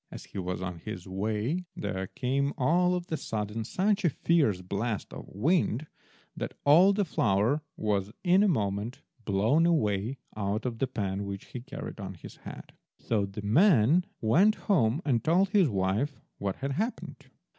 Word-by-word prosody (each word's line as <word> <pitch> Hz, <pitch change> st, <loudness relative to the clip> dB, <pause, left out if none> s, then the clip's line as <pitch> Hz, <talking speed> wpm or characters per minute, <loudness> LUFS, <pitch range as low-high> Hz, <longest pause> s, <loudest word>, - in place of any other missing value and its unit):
As -, -, -9 dB
he -, -, -7 dB
was 90 Hz, 0 st, -3 dB
on 90 Hz, -2 st, -5 dB
his 95 Hz, -1 st, -7 dB
way 110 Hz, -, -2 dB
there 95 Hz, -2 st, -3 dB
came 140 Hz, +6 st, -1 dB
all 175 Hz, +7 st, +3 dB
of 175 Hz, -1 st, -3 dB
a 160 Hz, -, 0 dB
sudden 105 Hz, -1 st, -3 dB
such 200 Hz, -, 0 dB
a 170 Hz, -, +4 dB
fierce 145 Hz, -, +1 dB
blast 100 Hz, +3 st, -3 dB
of -, -, -8 dB
wind 145 Hz, -, +1 dB, 0.5 s
that -, -, -5 dB
all 170 Hz, +7 st, +7 dB
the 200 Hz, 0 st, +1 dB
flour 110 Hz, -, +1 dB, 0.2 s
was, 105 Hz, -2 st, -1 dB
in 185 Hz, +1 st, +5 dB
a 210 Hz, -, +4 dB
moment, 110 Hz, -, -1 dB, 0.2 s
blown 110 Hz, +12 st, +3 dB
away 115 Hz, -, +1 dB, 0.2 s
out 105 Hz, +2 st, -2 dB
of 120 Hz, -3 st, -3 dB
the 135 Hz, -, +1 dB
pan 100 Hz, -5 st, -3 dB
which 100 Hz, -1 st, -6 dB
he 125 Hz, -, -5 dB
carried 135 Hz, -2 st, -8 dB
on 95 Hz, -1 st, -6 dB
his 85 Hz, -, -12 dB
head. -, -, -10 dB, 0.2 s
So 105 Hz, -3 st, -1 dB
the 100 Hz, +2 st, -8 dB
man 155 Hz, -, +4 dB
went 185 Hz, -, +4 dB
home 150 Hz, -, +1 dB
and 125 Hz, -6 st, +1 dB
told 180 Hz, +4 st, +3 dB
his 190 Hz, -6 st, +4 dB
wife 100 Hz, +8 st, -1 dB, 0.2 s
what 100 Hz, -1 st, -2 dB
had 140 Hz, +1 st, -4 dB
happened. 220 Hz, -, -4 dB
120 Hz, 170 wpm, -29 LUFS, 100-165 Hz, 0.5 s, all